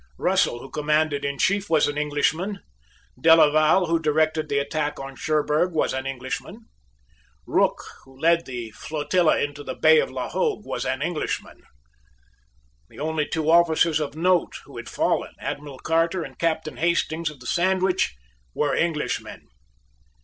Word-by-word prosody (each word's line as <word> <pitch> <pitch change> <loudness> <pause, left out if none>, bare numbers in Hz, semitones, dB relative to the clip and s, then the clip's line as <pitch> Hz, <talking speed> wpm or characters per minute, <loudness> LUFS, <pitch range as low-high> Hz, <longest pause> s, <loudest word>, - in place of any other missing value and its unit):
Russell - - +1
who 135 - -11
commanded 150 -1 0
in 140 0 -2
chief 200 +6 +1
was 160 -2 +3
an 145 - -3
Englishman. 155 +7 -1 0.6
Delaval 155 +2 +5
who 165 0 +1
directed 155 0 +1
the 140 - 0
attack 145 +1 -2
on 135 0 -7
Cherburg 155 +4 0
was 160 - 0
an 130 0 -3
Englishman. 130 -1 -5 0.8
Rooke - - +1 0.2
who 135 0 -19
led 170 +1 +2
the 120 -3 -6
flotilla 155 - +1
into 145 0 -3
the - - -5
Bay 475 - +5
of - - 0
La - - -4
Hogue 450 - -1
was 130 - -3
an 130 +2 -1
Englishman. 170 -1 -4 1.3
The - - -17
only 155 0 -1
two 160 0 0
officers 165 -2 +4
of 150 -1 -4
note 180 +2 +1
who - - -12
had - - -7
fallen, - - -1
Admiral 145 -2 -6
Carter 165 +4 0
and - - -11
Captain 160 -2 -1
Hastings 165 -1 0
of 150 -3 -13
the 125 - -14
Sandwich, 185 - +1 0.4
were 145 -1 +1
Englishmen. 160 -3 -2
155 Hz, 150 wpm, -24 LUFS, 145-170 Hz, 1.3 s, Delaval